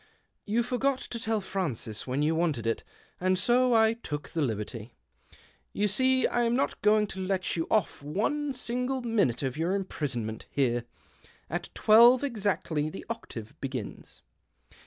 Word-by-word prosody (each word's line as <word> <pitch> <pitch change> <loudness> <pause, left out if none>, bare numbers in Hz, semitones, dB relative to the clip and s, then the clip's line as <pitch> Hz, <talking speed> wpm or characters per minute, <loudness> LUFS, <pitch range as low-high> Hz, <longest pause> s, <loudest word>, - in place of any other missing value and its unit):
" - - -50
You 235 - +4
forgot 255 +2 0
to 235 - -6
tell 220 -1 -1
Francis 135 - -3
when 130 +3 0
you 155 +2 +2
wanted 160 -9 0
it, 115 - -1 0.4
and 185 +1 +2
so 245 +5 +4
I 220 0 +5
took 150 -10 -6
the 165 - -2
liberty. 110 -2 -3 0.8
You 210 - +1
see 260 +5 +3
I 240 - +1
am 235 0 +2
not 275 - -1
going 210 0 +4
to 195 - -7
let 185 -1 -1
you 165 -1 -2
off 215 -9 +1
one 225 - -1
single 250 +1 -2
minute 205 - +1
of 135 +1 -2
your 170 +4 0
imprisonment 125 - -3
bere. 120 -4 +1 0.7
At - - -3
twelve 235 +4 +7
exactly 200 - -1
the 190 - -8
octave 115 - -7
begins." 130 -6 -6
195 Hz, 155 wpm, -28 LUFS, 140-235 Hz, 0.8 s, twelve